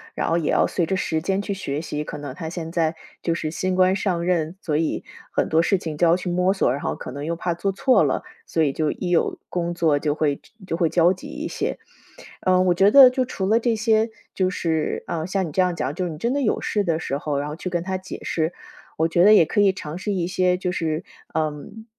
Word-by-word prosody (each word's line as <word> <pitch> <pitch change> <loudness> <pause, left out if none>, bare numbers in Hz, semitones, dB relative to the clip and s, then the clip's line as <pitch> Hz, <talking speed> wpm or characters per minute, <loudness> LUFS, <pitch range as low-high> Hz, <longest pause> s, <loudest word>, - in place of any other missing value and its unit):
然 - - -1
后 165 - +2
也 160 -3 -1
要 - - +3
随 175 - 0
着 190 - -1
时 160 -4 -1
间 195 +3 0
去 205 - -3
学 150 -7 -3
习， 150 -2 -4
可 - - -6
能 145 -3 -6
他 160 +3 -6
现 165 -1 -5
在 165 -1 0 0.3
就 165 - 0
是 155 -2 -3
新 185 +2 -1
官 185 0 +4
上 185 -3 -1
任， 170 -2 0
所 150 -3 -1
以 160 0 -1 0.3
很 - - +1
多 160 +1 +4
事 195 +3 +2
情 160 -4 -5
就 170 - +4
要 165 - +5
去 185 0 -4
摸 180 +2 +2
索， 195 - +1
然 135 - -2
后 - - -2
可 - - -8
能 140 +3 -6
又 170 +2 -1
怕 175 +1 -2
做 195 +4 -2
错 255 +7 +4
了， - - 0 0.2
所 165 - 0
以 145 - +2
就 155 +2 -1
一 180 - -4
有 175 - +1
工 175 -1 -2
作 160 -4 +2
就 150 0 0
会 150 -2 0 0.3
就 165 - -2
会 170 -2 +2
焦 170 +2 +4
急 185 - -6
一 - - -6
些。 - - -2 0.7
嗯， 185 0 +4
我 180 - +4
觉 195 +3 +5
得 270 -1 +10
就 255 0 0
除 200 -6 -3
了 220 +2 +4
这 235 0 +1
些， 220 0 +2 0.2
就 185 -1 +1
是， 160 -4 -1
嗯， 160 -1 -2
像 190 +1 -1
你 165 - -5
这 170 - 0
样 180 -1 +2
讲 145 -4 -2
就 180 +4 -3
是 175 - -3
你 155 - -8
真 235 +9 0
的 285 - 0
有 245 - +1
事 205 -1 0
的 165 -3 0
时 140 -3 -2
候， 145 -1 -2
然 145 - -3
后 150 - -6
去 180 - -5
跟 175 -1 -1
他 190 +1 -2
解 190 +1 -8
释。 160 +1 -1 0.5
我 160 +1 +2
觉 170 +1 +3
得 210 +2 +8
也 185 - +7
可 205 +7 0
以 200 -1 +5
尝 155 -3 -6
试 205 - -3
一 185 -4 0
些 180 0 +1
就 180 0 -2
是， 160 -3 -2 0.3
嗯， 155 +8 -3
175 Hz, 285 characters per minute, -23 LUFS, 160-190 Hz, 0.7 s, 得